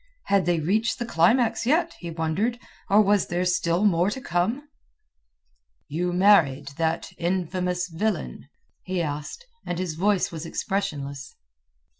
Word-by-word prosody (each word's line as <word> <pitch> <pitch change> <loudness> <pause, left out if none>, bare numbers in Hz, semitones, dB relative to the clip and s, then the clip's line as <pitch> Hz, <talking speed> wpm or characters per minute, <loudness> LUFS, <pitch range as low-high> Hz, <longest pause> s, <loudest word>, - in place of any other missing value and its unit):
Had 195 -4 +1
they 175 -2 +2
reached 210 +9 0
the 240 - -3
climax 230 +4 +2
yet, 325 +7 +2
he 170 - -6
wondered, 165 +9 -1 0.3
or 210 +2 +6
was 205 0 +2
there 175 +1 -1
still 180 +1 +1
more 180 -1 +3
to 235 - -4
come? 225 - -1 1.2
"You 175 +4 -1
married 170 -7 +4
that 165 0 -1
infamous 180 0 -1
villain?" 175 - -3 0.3
he 185 -1 -3
asked, 150 - -4 0.2
and 175 - -4
his 180 -3 -2
voice 195 +3 +1
was 160 -2 -6
expressionless. 145 -6 -4
180 Hz, 135 wpm, -25 LUFS, 165-205 Hz, 1.2 s, or